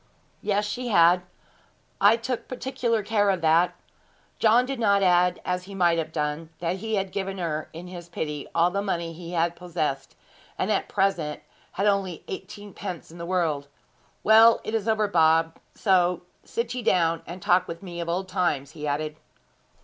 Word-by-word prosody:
'Yes, 205 Hz, 0 st, 0 dB
she 245 Hz, +4 st, -4 dB
had; 175 Hz, -4 st, +5 dB, 0.8 s
I 210 Hz, +3 st, +6 dB
took 235 Hz, +1 st, -4 dB
particular 250 Hz, -4 st, -1 dB
care 205 Hz, -1 st, +2 dB
of 190 Hz, -3 st, +1 dB
that.' 170 Hz, +2 st, +3 dB, 0.6 s
John 230 Hz, +3 st, +5 dB
did 270 Hz, -1 st, -4 dB
not 200 Hz, -3 st, +3 dB
add, 180 Hz, -1 st, +3 dB
as 180 Hz, 0 st, -2 dB
he 200 Hz, +1 st, -9 dB
might 175 Hz, -3 st, +3 dB
have 160 Hz, 0 st, -3 dB
done, 150 Hz, +1 st, -3 dB
that 175 Hz, +2 st, -2 dB
he 220 Hz, +3 st, -2 dB
had 195 Hz, -1 st, -1 dB
given 195 Hz, -1 st, -3 dB
her, 160 Hz, -4 st, -3 dB
in 170 Hz, +2 st, -9 dB
his 175 Hz, -1 st, -9 dB
pity, 150 Hz, -3 st, -4 dB
all 170 Hz, +2 st, +4 dB
the 200 Hz, +2 st, -1 dB
money 170 Hz, -4 st, -2 dB
he 170 Hz, +1 st, -6 dB
possessed, 165 Hz, -6 st, -4 dB, 0.4 s
and -, -, 0 dB
at -, -, 0 dB
present 170 Hz, -6 st, 0 dB, 0.3 s
had 195 Hz, -, -1 dB
only 195 Hz, -5 st, 0 dB
eighteen 205 Hz, +2 st, -8 dB
pence 180 Hz, -6 st, -7 dB
in 170 Hz, -, -12 dB
the 170 Hz, -, -5 dB
world. 160 Hz, -6 st, 0 dB, 0.6 s
'Well, 225 Hz, +1 st, +7 dB
it 215 Hz, -, -5 dB
is 225 Hz, -1 st, -1 dB
over, 215 Hz, -1 st, +2 dB
Bob; 165 Hz, -2 st, +3 dB, 0.2 s
so 180 Hz, -3 st, +2 dB, 0.2 s
sit 235 Hz, +1 st, -3 dB
ye 250 Hz, -, -3 dB
down, 165 Hz, -6 st, +2 dB
and 175 Hz, +2 st, -7 dB
talk 180 Hz, +1 st, +2 dB
with 170 Hz, +2 st, -7 dB
me 175 Hz, -2 st, -7 dB
of 170 Hz, -, -4 dB
old 185 Hz, +3 st, -1 dB
times,' 175 Hz, -7 st, -1 dB
he 150 Hz, -1 st, -6 dB
added. 150 Hz, +1 st, -2 dB
180 Hz, 180 wpm, -25 LUFS, 165-205 Hz, 0.8 s, Well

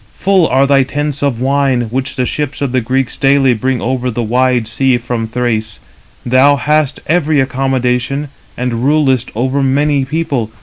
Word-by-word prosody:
Full 190 Hz, -3 st, +2 dB
are 135 Hz, +2 st, +3 dB
thy 140 Hz, 0 st, +4 dB
tents 145 Hz, +1 st, -3 dB
of 140 Hz, -5 st, 0 dB
wine, 135 Hz, -1 st, +1 dB
which 130 Hz, +2 st, -3 dB
the 125 Hz, -2 st, 0 dB
ships 145 Hz, +1 st, -3 dB
of 135 Hz, -, -1 dB
the 130 Hz, 0 st, +1 dB
Greeks 130 Hz, +2 st, -1 dB
daily 135 Hz, -1 st, +3 dB
bring 125 Hz, +3 st, -1 dB
over 125 Hz, +1 st, -2 dB
the 120 Hz, 0 st, -3 dB
wide 125 Hz, 0 st, +1 dB
sea 130 Hz, +2 st, +1 dB
from 120 Hz, -2 st, -3 dB
Thrace. 110 Hz, -2 st, -2 dB, 0.5 s
Thou 130 Hz, +4 st, +4 dB
hast 150 Hz, +1 st, 0 dB
every 155 Hz, -3 st, +1 dB
accommodation, 130 Hz, +1 st, -1 dB, 0.3 s
and 125 Hz, -1 st, -2 dB
rulest 135 Hz, -3 st, +2 dB
over 130 Hz, +4 st, 0 dB
many 140 Hz, +1 st, +1 dB
people. 135 Hz, -6 st, -2 dB
130 Hz, 165 wpm, -14 LUFS, 125-140 Hz, 0.5 s, thy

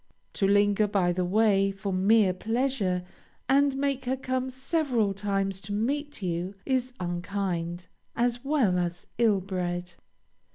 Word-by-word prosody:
To 195 Hz, -, +1 dB
linger 205 Hz, +1 st, +3 dB
by 195 Hz, -3 st, +2 dB
the 180 Hz, +1 st, 0 dB
way, 195 Hz, +1 st, +3 dB
for 195 Hz, 0 st, -4 dB
mere 195 Hz, +1 st, +4 dB
pleasure, 220 Hz, -3 st, -1 dB, 0.4 s
and 275 Hz, +1 st, +3 dB
make 275 Hz, -2 st, -1 dB
her 260 Hz, +2 st, 0 dB
come 260 Hz, 0 st, -2 dB
several 260 Hz, -5 st, 0 dB
times 195 Hz, -1 st, -1 dB
to 205 Hz, +2 st, -6 dB
meet 280 Hz, +4 st, -2 dB
you, 180 Hz, +2 st, -2 dB
is 255 Hz, -1 st, 0 dB
unkind, 175 Hz, -1 st, -3 dB, 0.3 s
as 240 Hz, 0 st, 0 dB
well 265 Hz, -11 st, +2 dB
as 175 Hz, 0 st, -3 dB
ill 215 Hz, -5 st, +4 dB
bred. 180 Hz, -2 st, -3 dB
205 Hz, 135 wpm, -27 LUFS, 185-255 Hz, 0.4 s, mere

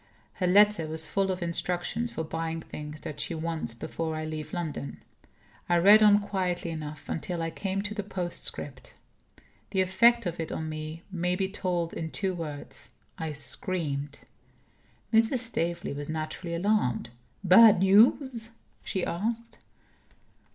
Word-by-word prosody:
Her 180 Hz, -, -1 dB
letter 205 Hz, -3 st, +5 dB
was 160 Hz, 0 st, -2 dB
full 195 Hz, +4 st, 0 dB
of 185 Hz, -1 st, -2 dB
instructions 175 Hz, +7 st, -2 dB
for 160 Hz, -, -4 dB
buying 165 Hz, +1 st, -3 dB
things 150 Hz, 0 st, -8 dB
that 150 Hz, -, -5 dB
she 170 Hz, -, -2 dB
wants, 160 Hz, -7 st, -4 dB
before 160 Hz, +6 st, -4 dB
I 155 Hz, 0 st, -3 dB
leave 155 Hz, -1 st, -5 dB
London. 160 Hz, -5 st, -4 dB, 0.7 s
I 175 Hz, -, +4 dB
read 205 Hz, +5 st, +7 dB
on 205 Hz, -1 st, +7 dB
quietly 180 Hz, -4 st, -2 dB
enough 155 Hz, -2 st, -7 dB
until 170 Hz, +2 st, -3 dB
I 165 Hz, 0 st, -2 dB
came 195 Hz, +2 st, -3 dB
to 210 Hz, 0 st, -3 dB
the 210 Hz, -, -3 dB
postscript. 180 Hz, -3 st, -4 dB, 0.7 s
The 190 Hz, -, +1 dB
effect 235 Hz, +5 st, +4 dB
of 175 Hz, -1 st, -3 dB
it 160 Hz, -, -3 dB
on 160 Hz, -, -3 dB
me 155 Hz, +2 st, -6 dB
may 180 Hz, -1 st, 0 dB
be 190 Hz, +1 st, 0 dB
told 180 Hz, -4 st, -2 dB
in 160 Hz, -, -4 dB
two 190 Hz, +3 st, -1 dB
words: 155 Hz, -5 st, -7 dB, 0.3 s
I 160 Hz, -2 st, -3 dB
screamed. 145 Hz, -2 st, 0 dB, 0.9 s
Mrs. 225 Hz, +4 st, +4 dB
Staveley 175 Hz, -, -1 dB
was 145 Hz, +1 st, -6 dB
naturally 160 Hz, +2 st, -4 dB
alarmed. 170 Hz, -, 0 dB, 0.3 s
"Bad 205 Hz, +3 st, +8 dB
news?" 225 Hz, +4 st, +4 dB, 0.3 s
she 190 Hz, -, -2 dB
asked. 230 Hz, +6 st, -3 dB
175 Hz, 145 wpm, -28 LUFS, 160-200 Hz, 0.9 s, Bad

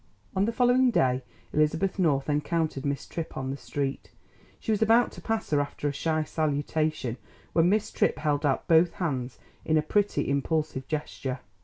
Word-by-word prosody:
On 190 Hz, +1 st, +3 dB
the 230 Hz, -, 0 dB
following 250 Hz, +2 st, +4 dB
day 130 Hz, -, +2 dB, 0.3 s
Elizabeth 160 Hz, +6 st, +1 dB
North 145 Hz, -6 st, +2 dB
encountered 150 Hz, -1 st, 0 dB
Miss 140 Hz, -1 st, -2 dB
Tripp 165 Hz, -1 st, -6 dB
on 135 Hz, 0 st, -2 dB
the -, -, -3 dB
street. 140 Hz, -1 st, -3 dB, 0.5 s
She 225 Hz, -, -2 dB
was 215 Hz, -, +1 dB
about 225 Hz, +2 st, +4 dB
to -, -, -11 dB
pass 225 Hz, -4 st, -2 dB
her 145 Hz, -1 st, +4 dB
after 145 Hz, +1 st, -3 dB
a 145 Hz, -, -1 dB
shy 155 Hz, +2 st, 0 dB
salutation, 155 Hz, -4 st, -1 dB, 0.4 s
when 165 Hz, +1 st, +4 dB
Miss 210 Hz, +2 st, +1 dB
Tripp -, -, +1 dB
held 145 Hz, -1 st, 0 dB
out 140 Hz, -3 st, 0 dB
both 165 Hz, +1 st, +5 dB
hands 130 Hz, -, -3 dB, 0.3 s
in 155 Hz, -, +2 dB
a 155 Hz, -, +2 dB
pretty, 205 Hz, +5 st, +1 dB
impulsive 140 Hz, -1 st, -1 dB
gesture. 140 Hz, -4 st, -3 dB
155 Hz, 175 wpm, -27 LUFS, 140-180 Hz, 0.5 s, both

